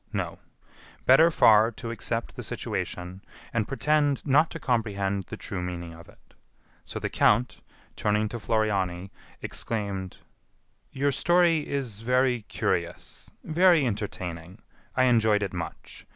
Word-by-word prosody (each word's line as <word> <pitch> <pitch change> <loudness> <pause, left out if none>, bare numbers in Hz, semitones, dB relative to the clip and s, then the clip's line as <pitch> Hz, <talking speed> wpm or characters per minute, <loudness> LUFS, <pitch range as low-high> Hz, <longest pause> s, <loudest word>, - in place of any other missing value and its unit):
No; - - -3 0.7
better 150 +6 +7
far 110 -8 +5
to 115 +2 -6
accept 115 +1 -3
the - - -6
situation, 90 +2 -5 0.3
and 110 -3 0
pretend 145 0 +1
not 150 +3 +4
to 165 - -7
comprehend 100 - -1
the - - -8
true 90 - -5
meaning 85 -2 -5
of 85 +1 -14
it. - - -22 0.5
So - - -7
the - - -2
count, 120 +4 +2 0.3
turning 105 +1 +1
to 120 - -5
Floriani, 100 -5 -1 0.3
exclaimed: 100 -4 -3 0.7
"Your 140 +1 0
story 170 0 +2
is 125 -8 -3
very 125 +1 +1
curious, - - -3
very 170 -2 +4
entertaining; 95 -4 -5 0.3
I 130 - +3
enjoyed 110 -4 +3
it 95 - -4
much. 85 -2 -7
110 Hz, 130 wpm, -27 LUFS, 95-135 Hz, 0.7 s, better